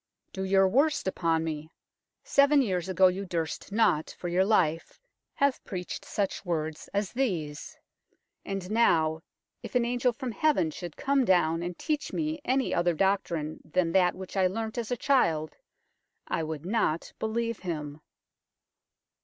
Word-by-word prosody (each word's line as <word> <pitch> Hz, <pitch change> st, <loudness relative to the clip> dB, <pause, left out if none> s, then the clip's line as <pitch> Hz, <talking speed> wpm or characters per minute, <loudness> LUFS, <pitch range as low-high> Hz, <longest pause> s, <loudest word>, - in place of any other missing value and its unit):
" -, -, -51 dB
Do 190 Hz, -, -4 dB
your 195 Hz, 0 st, +4 dB
worst 280 Hz, +5 st, +2 dB
upon 165 Hz, -3 st, +1 dB
me. 155 Hz, -1 st, -4 dB, 0.5 s
Seven 280 Hz, 0 st, +4 dB
years 185 Hz, -5 st, -2 dB
ago 185 Hz, 0 st, +4 dB
you 185 Hz, +2 st, +2 dB
durst 165 Hz, -1 st, -4 dB
not, 200 Hz, -8 st, +2 dB
for 175 Hz, -, -4 dB
your 180 Hz, +2 st, +3 dB
life, 170 Hz, -6 st, +1 dB, 0.4 s
have 280 Hz, -1 st, +1 dB
preached 180 Hz, -2 st, -6 dB
such 200 Hz, -2 st, -2 dB
words 160 Hz, -4 st, -3 dB
as 200 Hz, -1 st, -1 dB
these; 170 Hz, -, -2 dB, 0.7 s
and 195 Hz, -1 st, -5 dB
now, 160 Hz, -8 st, +3 dB, 0.4 s
if -, -, -9 dB
an 245 Hz, -1 st, +3 dB
angel 245 Hz, +1 st, +1 dB
from 250 Hz, +1 st, -5 dB
heaven 205 Hz, -, +2 dB
should 170 Hz, +1 st, -8 dB
come 280 Hz, -1 st, +2 dB
down 170 Hz, -5 st, +3 dB
and 175 Hz, 0 st, -4 dB
teach 305 Hz, -2 st, -2 dB
me 310 Hz, -1 st, -2 dB
any 265 Hz, +1 st, +1 dB
other 175 Hz, -1 st, +2 dB
doctrine 170 Hz, -4 st, 0 dB
than 165 Hz, +1 st, 0 dB
that 180 Hz, 0 st, +3 dB
which 190 Hz, +1 st, -9 dB
I 190 Hz, -1 st, +4 dB
learnt 220 Hz, +4 st, -3 dB
as 230 Hz, -, -4 dB
a 245 Hz, -, -1 dB
child, 165 Hz, -, +1 dB, 0.7 s
I -, -, -1 dB
would 160 Hz, 0 st, -5 dB
not 185 Hz, -6 st, 0 dB
believe 230 Hz, +1 st, -2 dB
him. 150 Hz, -4 st, -5 dB
190 Hz, 155 wpm, -28 LUFS, 165-235 Hz, 0.7 s, your